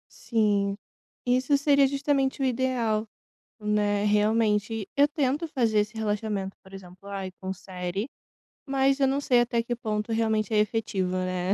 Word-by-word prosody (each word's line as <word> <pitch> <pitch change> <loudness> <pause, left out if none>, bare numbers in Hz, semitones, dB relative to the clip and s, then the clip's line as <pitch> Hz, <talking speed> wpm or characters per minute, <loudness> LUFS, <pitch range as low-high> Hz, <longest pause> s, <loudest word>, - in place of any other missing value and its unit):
Sim. 205 -3 +1 0.5
Isso 255 +3 +3
seria 280 -1 +4
justamente 275 -1 0
o - - +1
ideal, 240 -4 0 0.5
né, 210 -1 +1
realmente. 210 0 +1
Eu 285 +1 +6
tento 295 +1 -1
fazer 235 -8 +1
esse 210 +2 0
relaxamento, 210 -2 -2
por 190 0 -15
exemplo, 185 +1 -12
ai, 195 -1 -4
com 190 0 -3
série, 185 +5 -5 0.6
mas 270 0 +2
eu 270 - +4
não 275 +2 0
sei 250 -3 +3
até 235 -1 0
que 240 +1 -2
ponto 215 -1 -3
realmente 220 -1 0
é - - +3
efetivo, 210 -4 0
né? 185 +1 -1
220 Hz, 150 wpm, -27 LUFS, 200-255 Hz, 0.6 s, Eu